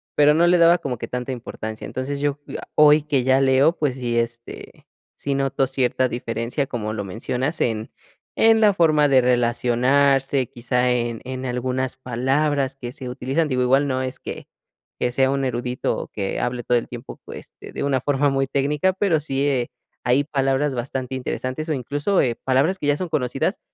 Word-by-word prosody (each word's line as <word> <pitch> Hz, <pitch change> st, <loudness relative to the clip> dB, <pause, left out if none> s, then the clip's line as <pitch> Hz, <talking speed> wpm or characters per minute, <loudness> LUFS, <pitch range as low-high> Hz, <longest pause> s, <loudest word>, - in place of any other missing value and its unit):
pero 150 Hz, 0 st, +5 dB
no 170 Hz, +3 st, +4 dB
le 175 Hz, +1 st, +5 dB
daba 170 Hz, +1 st, +6 dB
como 125 Hz, -3 st, -4 dB
que -, -, -6 dB
tanta 125 Hz, +1 st, -4 dB
importancia. 110 Hz, -2 st, -6 dB
Entonces, 140 Hz, +2 st, -4 dB
yo, 145 Hz, 0 st, -1 dB, 0.2 s
ah, -, -, -9 dB
hoy 150 Hz, 0 st, +6 dB
que 140 Hz, -4 st, 0 dB
ya 130 Hz, +1 st, +3 dB
leo, 135 Hz, +5 st, +4 dB
pues 145 Hz, -4 st, 0 dB
sí, 120 Hz, -2 st, -2 dB
este, 115 Hz, 0 st, -6 dB, 0.3 s
sí 140 Hz, -1 st, -3 dB
noto 135 Hz, -1 st, 0 dB
cierta 130 Hz, -1 st, 0 dB
diferencia, 120 Hz, +3 st, -3 dB
como 110 Hz, -4 st, -4 dB
lo 105 Hz, -, -3 dB
mencionas, 125 Hz, -, -3 dB
en 110 Hz, -2 st, -1 dB, 0.5 s
en 225 Hz, 0 st, +5 dB
la 210 Hz, -2 st, +5 dB
forma 155 Hz, -5 st, +3 dB
de 135 Hz, -1 st, +6 dB
relacionarse, 125 Hz, +2 st, +2 dB
quizá 125 Hz, +1 st, 0 dB
en 120 Hz, -2 st, -1 dB
en 130 Hz, 0 st, -5 dB
algunas 130 Hz, +1 st, -2 dB
palabras 135 Hz, +2 st, 0 dB
que 120 Hz, -2 st, -6 dB
se 135 Hz, -4 st, -8 dB
utilizan. 135 Hz, +6 st, -1 dB
Digo, 125 Hz, -1 st, 0 dB
igual 135 Hz, +3 st, +3 dB
no 130 Hz, -1 st, -1 dB
es 130 Hz, 0 st, -4 dB
que -, -, -8 dB, 0.5 s
que 120 Hz, -, 0 dB
sea 135 Hz, +1 st, +2 dB
un 135 Hz, 0 st, -1 dB
erudito 125 Hz, 0 st, -2 dB
o -, -, -5 dB
que 100 Hz, -2 st, -3 dB
hable 120 Hz, 0 st, -2 dB
todo 125 Hz, -, +2 dB
el 115 Hz, -, -3 dB
tiempo 120 Hz, -1 st, -9 dB
pues -, -, -10 dB
de -, -, -11 dB
de -, -, -3 dB
una 140 Hz, -2 st, +1 dB
forma 145 Hz, +1 st, +1 dB
muy 135 Hz, 0 st, 0 dB
técnica, 145 Hz, +7 st, +1 dB
pero 190 Hz, -5 st, +1 dB
sí, 140 Hz, -2 st, -2 dB
eh, 130 Hz, -4 st, 0 dB, 0.4 s
hay 130 Hz, +4 st, +3 dB
palabras 135 Hz, -1 st, 0 dB
bastante 130 Hz, +1 st, -4 dB
interesantes 130 Hz, +3 st, -4 dB
o 155 Hz, -, +1 dB
incluso, 145 Hz, -, 0 dB
eh, 120 Hz, -2 st, 0 dB
palabras 135 Hz, +11 st, +1 dB
que 145 Hz, -, -3 dB
ya 145 Hz, -, +3 dB
son 180 Hz, +1 st, -4 dB
conocidas, 140 Hz, -, -1 dB
130 Hz, 190 wpm, -22 LUFS, 125-145 Hz, 0.5 s, daba